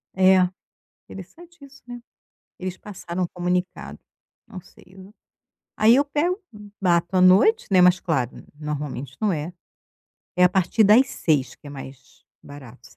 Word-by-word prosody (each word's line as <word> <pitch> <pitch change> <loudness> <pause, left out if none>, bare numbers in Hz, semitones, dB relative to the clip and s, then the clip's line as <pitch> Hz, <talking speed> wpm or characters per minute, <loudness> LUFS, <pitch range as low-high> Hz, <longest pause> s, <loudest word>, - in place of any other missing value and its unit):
É, 185 -1 +4 0.6
interessante 330 - -13
isso, 275 0 -18
né? 245 0 -9 0.6
Eles 185 0 -6
passaram 185 -3 -6
um - - -2
comunicado. 180 +1 -3 0.5
Não 195 -4 -10
sei, - - -21
eu 190 +2 -16 0.6
aí 220 +3 +5
eu 280 +2 +2
pego, 325 +7 -1 0.4
bato 175 0 +1
à 185 - +3
noite, 200 - +4
né. 185 -2 +5
Mas, 180 0 +5
claro, 135 -10 -2 0.3
normalmente 145 -3 -6
não 215 -2 +1
é 155 +2 -5 0.8
É 180 - +5
à - - +6
partir 190 +4 +1
das 220 +6 +5
6 135 -6 -1
que - - -18
é - - -9
mais 135 -2 -13 0.2
barato, 135 -3 -13
s - - -23
185 Hz, 155 wpm, -22 LUFS, 155-210 Hz, 0.8 s, à